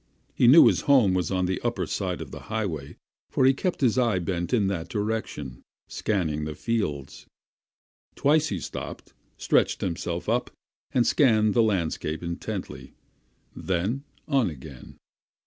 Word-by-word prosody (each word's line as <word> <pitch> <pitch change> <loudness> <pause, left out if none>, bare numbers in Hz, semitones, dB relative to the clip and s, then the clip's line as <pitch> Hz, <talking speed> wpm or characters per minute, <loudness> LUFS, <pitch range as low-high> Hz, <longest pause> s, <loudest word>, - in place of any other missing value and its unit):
He 120 - +3
knew 145 +7 +9
his - - +3
home 125 -9 +5
was 90 -3 0
on 95 -1 0
the 95 +1 -2
upper - - -1
side - - -3
of - - -8
the - - -9
road, 95 -11 -3 0.3
for 130 - +2
he 135 - +6
kept 180 +5 -2
his 130 -1 +3
eye 115 -6 +2
bent 85 0 -2
in 115 -5 +2
that 90 -3 -2
direction, 105 - -4 0.3
scanning 80 -8 -1
the 75 0 -5
fields. 75 - -3 0.9
Twice 150 +2 +3
he 95 - -3
stopped, - - -7 0.2
stretched - - +1
himself 85 -1 -3
up, 120 +3 0 0.4
and 120 -2 +2
scanned 110 -7 +3
the 120 - +4
landscape 85 -6 -1
intently; 85 0 -6 0.6
then 95 +9 -2 0.2
on 135 - +2
again. 70 -3 -11
100 Hz, 145 wpm, -26 LUFS, 85-120 Hz, 0.9 s, knew